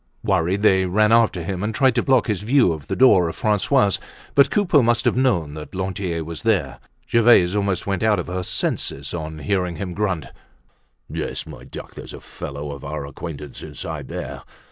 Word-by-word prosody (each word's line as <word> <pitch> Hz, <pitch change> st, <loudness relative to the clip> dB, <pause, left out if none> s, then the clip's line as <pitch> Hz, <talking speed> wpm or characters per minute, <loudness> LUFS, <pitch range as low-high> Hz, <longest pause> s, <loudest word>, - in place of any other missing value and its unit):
Worried, 95 Hz, -1 st, +1 dB
they 95 Hz, -3 st, +4 dB
ran 105 Hz, +4 st, +3 dB
after 115 Hz, -6 st, +3 dB
him 95 Hz, +1 st, -4 dB
and 110 Hz, +2 st, -2 dB
tried 130 Hz, -2 st, +4 dB
to 120 Hz, -, +1 dB
block 130 Hz, -2 st, +3 dB
his 105 Hz, -4 st, -1 dB
view 120 Hz, -2 st, +3 dB
of 75 Hz, -3 st, -9 dB
the 95 Hz, -, -2 dB
door 95 Hz, -9 st, +5 dB
of -, -, -7 dB
Francois's. 105 Hz, -1 st, +2 dB, 0.3 s
But 140 Hz, -1 st, +5 dB
Coupeau 185 Hz, -9 st, +3 dB
must 120 Hz, -1 st, +1 dB
have -, -, +3 dB
known 100 Hz, -, +1 dB
that 75 Hz, +4 st, -9 dB
Lantier 95 Hz, -3 st, -2 dB
was 80 Hz, 0 st, -7 dB
there. -, -, 0 dB, 0.3 s
Gervaise 115 Hz, -6 st, +5 dB
almost 100 Hz, -3 st, 0 dB
went 95 Hz, -2 st, -1 dB
out 110 Hz, -1 st, +3 dB
of 90 Hz, -, -3 dB
her 90 Hz, +1 st, -3 dB
senses 70 Hz, -5 st, -2 dB
on 80 Hz, -2 st, -5 dB
hearing 90 Hz, +3 st, -1 dB
him 90 Hz, +2 st, -5 dB
grunt: 95 Hz, -6 st, -1 dB, 0.8 s
"Yes, -, -, -4 dB
my -, -, -11 dB
duck, -, -, -10 dB
there's -, -, -9 dB
a -, -, -6 dB
young -, -, -11 dB
fellow 70 Hz, +1 st, -7 dB
of 70 Hz, -1 st, -9 dB
our 70 Hz, 0 st, -4 dB
acquaintance 75 Hz, 0 st, -8 dB
inside -, -, -6 dB
there! -, -, -6 dB
95 Hz, 195 wpm, -22 LUFS, 80-110 Hz, 0.8 s, door